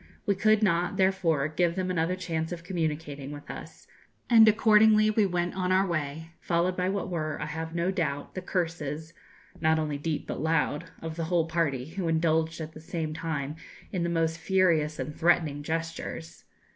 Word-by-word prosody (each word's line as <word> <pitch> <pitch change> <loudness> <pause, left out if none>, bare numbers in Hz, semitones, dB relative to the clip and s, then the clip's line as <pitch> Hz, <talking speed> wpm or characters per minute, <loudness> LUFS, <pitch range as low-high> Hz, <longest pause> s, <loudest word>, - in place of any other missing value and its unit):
We 200 - +3
could 215 +2 +3
not, 180 0 +1
therefore, 190 -7 +2
give 170 +2 0
them 185 -1 -1
another 175 +1 0
chance 165 -3 -3
of 170 -1 -6
communicating 155 -5 -3
with 145 0 -8
us, - - -10 0.5
and 225 -1 +8
accordingly 215 0 +5
we 210 -2 +3
went 175 -1 -1
on 185 -1 -1
our 190 +1 +4
way, 160 -2 -3
followed 175 +1 +1
by 180 0 0
what 200 0 -2
were, 155 -4 -3
I - - -3
have 160 +2 -5
no 170 +2 +1
doubt, 150 -7 -2
the 185 - -4
curses 165 -3 -3 0.5
not 160 0 +3
only 150 -2 -2
deep, 155 0 -2
but - - -4
loud 160 -2 +1 0.2
of 160 0 -5
the 165 - -1
whole 170 -1 +2
party, 160 -6 0
who 175 +1 -3
indulged 160 0 +1
at 160 0 -6
the 155 - -11
same 160 -1 -3
time 155 -2 -3 0.3
in 185 - -2
the 170 - 0
most 165 -1 0
furious 165 -6 +2
and 140 +3 -5
threatening 160 -4 +2
gestures. 165 +1 -5
165 Hz, 185 wpm, -28 LUFS, 155-185 Hz, 0.5 s, and